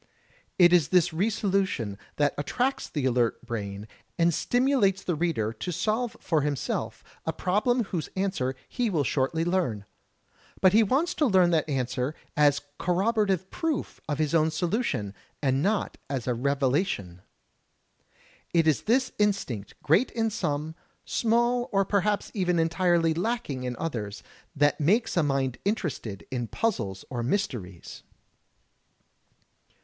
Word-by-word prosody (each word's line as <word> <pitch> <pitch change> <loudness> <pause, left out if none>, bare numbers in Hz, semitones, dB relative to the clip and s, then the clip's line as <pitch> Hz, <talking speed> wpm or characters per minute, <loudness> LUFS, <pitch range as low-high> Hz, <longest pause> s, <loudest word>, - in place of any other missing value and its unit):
It 175 -1 +7
is 170 -6 +5
this 175 -2 +3
re 190 +7 +1
solution 195 - 0 0.2
that 145 -1 +2
attracts 250 - -1
the 145 -4 -2
alert 120 -2 +1
brain, 105 -3 -5 0.3
and 170 0 +3
stimulates 245 - +2
the 180 - -1
reader 150 -10 -1
to 180 - -5
solve 220 +6 -1
for 160 -3 +1
himself 145 -2 -2 0.2
a - - +2
problem 230 +6 +1
whose 180 -5 -4
answer 190 -10 -1
he 245 -3 -1
will 160 -7 +1
shortly 140 +5 0
learn. 170 - 0 0.7
But 185 0 +5
he 220 - +7
wants 270 - +1
to 300 - +2
learn 185 -5 +4
that 160 -2 +1
answer 130 +1 -1 0.2
as 145 -1 +4 0.2
corroborative 190 0 +1
proof 325 -4 -3
of 145 - 0
his 155 0 0
own 160 -1 +4
solution, 160 - -1 0.3
and 135 -1 +1
not 200 +4 0
as 135 -4 -2
a 125 - +1
revelation. 130 - 0 1.3
It 165 -1 +4
is 155 -3 +3
this 255 +3 +2
instinct, 165 - -1
great 180 - +3
in 225 -1 0
some, 150 -3 -2 0.3
small 240 +1 +1
or 195 -1 +2
perhaps 205 +1 0
even 180 -4 +1
entirely 165 0 +2
lacking 170 - -2
in 125 -1 -3
others, 105 -10 -4 0.3
that 145 0 +2
makes 205 +10 +2
a 175 - +4
mind 135 -4 0
interested 160 - -3
in 120 -2 -2
puzzles 115 - -2
or 120 -2 -2
mysteries. 115 - -3
165 Hz, 140 wpm, -27 LUFS, 130-200 Hz, 1.3 s, It